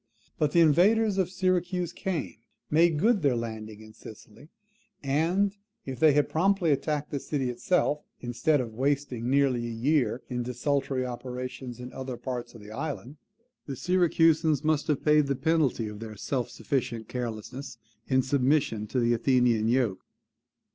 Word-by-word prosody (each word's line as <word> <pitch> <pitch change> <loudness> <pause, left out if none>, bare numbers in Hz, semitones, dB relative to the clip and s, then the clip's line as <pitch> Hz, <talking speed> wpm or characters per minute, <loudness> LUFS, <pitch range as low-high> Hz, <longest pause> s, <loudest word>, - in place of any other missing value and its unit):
But 150 -2 +2
the 170 - +5
invaders 195 +6 +4
of 185 -2 +1
Syracuse 180 -2 0
came; 175 - -3 0.3
made 165 +1 +4
good 215 +5 +3
their 140 -5 +2
landing 110 -2 -6
in 110 0 -13
Sicily; 110 +6 -13 0.5
and, 170 +9 +1 0.3
if 130 -3 -6
they 155 -1 +6
had 145 0 +3
promptly 180 0 +2
attacked 150 +1 -1
the 140 - -2
city 135 -3 -2
itself, 150 +3 0 0.2
instead 125 +5 +1
of 115 -3 -6
wasting 130 -1 -1
nearly 135 -3 +2
a - - -4
year 125 +2 0
in 125 -1 -3
desultory 130 +1 -1
operations 125 0 -6
in 125 0 -8
other 130 -2 -5
parts 120 -2 -5
of 115 - -11
the 105 - -11
island, 140 +2 -5 0.5
the 140 - -4
Syracusans 165 -3 +2
must 155 -1 +1
have 150 -3 -1
paid 150 -1 +4
the 140 - 0
penalty 150 -7 +1
of 105 -1 -8
their 110 -1 -7
self 125 +2 -2
sufficient 115 -2 -3
carelessness 120 +2 -6 0.3
in 130 -1 +2
submission 130 -5 +1
to 130 - -1
the 120 0 +2
Athenian 120 -2 +2
yoke. 120 -5 +1
135 Hz, 155 wpm, -28 LUFS, 120-155 Hz, 0.5 s, they